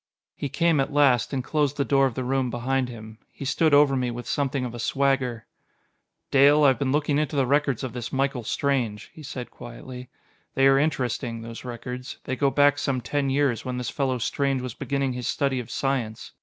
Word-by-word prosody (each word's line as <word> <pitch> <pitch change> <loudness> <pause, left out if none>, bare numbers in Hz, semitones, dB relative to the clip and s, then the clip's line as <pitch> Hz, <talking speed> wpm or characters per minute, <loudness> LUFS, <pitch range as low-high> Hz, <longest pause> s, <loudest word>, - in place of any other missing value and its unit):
He 140 - -4
came 160 +2 +2
at 135 - 0
last, 140 -5 +3
and 135 -2 -2
closed 145 -1 0
the 140 - +1
door 135 -1 +3
of 125 - -6
the 130 - -2
room 130 0 0
behind 125 +2 -1
him. 110 -2 -10
He 140 - -8
stood 155 +3 +2
over 145 -1 +5
me 125 -1 0
with 120 0 -6
something 140 -2 -1
of 120 - -5
a 120 - -7
swagger. 130 -3 0 0.9
"Dale, 145 +2 +6
I 140 - +7
have 130 -3 +1
been 135 -2 0
looking 145 0 +1
into 150 0 -1
the 135 -2 +2
records 140 -1 +1
of 130 -4 -4
this 120 -2 -5
Michael 135 -2 -1
Strange," 120 -4 -1
he 155 - -12
said 130 -3 -7
quietly. 125 +1 -10 0.5
"They 135 - +4
are 135 0 +6
interesting, 125 -5 -1
those 115 0 -8
records. 125 +1 -7
They 130 - -3
go 140 +2 +2
back 145 +1 +3
some 135 -3 0
ten 140 +2 -1
years, 135 -4 +1
when 125 -1 -4
this 125 -2 -3
fellow 130 -2 0
Strange 135 +2 -1
was 125 -3 -5
beginning 140 0 -2
his 125 -1 -4
study 140 -2 0
of 120 - -7
science. 125 -5 -2
135 Hz, 210 wpm, -25 LUFS, 125-140 Hz, 0.9 s, I